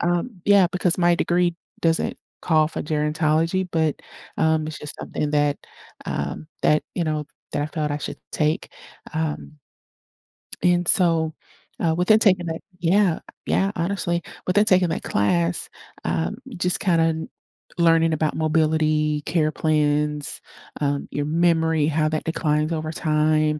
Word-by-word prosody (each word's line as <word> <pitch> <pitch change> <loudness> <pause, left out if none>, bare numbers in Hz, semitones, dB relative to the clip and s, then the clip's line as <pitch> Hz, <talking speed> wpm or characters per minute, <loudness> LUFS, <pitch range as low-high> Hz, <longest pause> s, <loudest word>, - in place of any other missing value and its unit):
um, 175 +4 -1
yeah, 200 -3 +6
because 180 -1 +1
my 175 0 +4
degree 175 -1 +1 0.3
doesn't 165 -1 +1 0.3
call 155 -3 +3
for - - -5
gerontology, 155 +4 0
but, 160 -2 0 0.4
um, 160 -1 +2
it's 155 - -6
just 150 - -7
something 150 - -3
that 145 -1 +2 0.5
um, 70 - -4
that, 150 0 +3
you 170 - -1
know, 155 -1 -1 0.3
that 145 - -1
I - - -1
thought 155 -1 -3
I 145 - -2
should - - -6
take, 155 +1 0 0.4
um 155 -1 -3 1.1
And 175 -1 +3
so, 165 -3 +4 0.5
uh, 165 -2 +1
within 180 +5 +4
taking 185 -5 +3
that 160 0 -4 0.2
yeah, 180 0 +2 0.3
yeah, 195 +1 +1
honestly. 175 -1 -1 0.3
Within 205 +3 +3
taking 185 -3 +4
that 160 - -3
class, 90 -4 +1 0.3
uh, 165 - -1 0.3
just 180 +1 +1
kinda 165 -4 +1 0.5
learning 165 -1 +4
about 155 0 0
mobility, 155 -1 +1
care 155 -3 +1
plans, 150 -1 0 0.4
uh, 140 0 +1
your 145 - -2
memory, 160 -1 +2
how 155 0 +1
that 155 0 -2
declines 155 -1 0
over 155 0 -3
time, 155 -1 +1
160 Hz, 140 wpm, -23 LUFS, 150-175 Hz, 1.1 s, yeah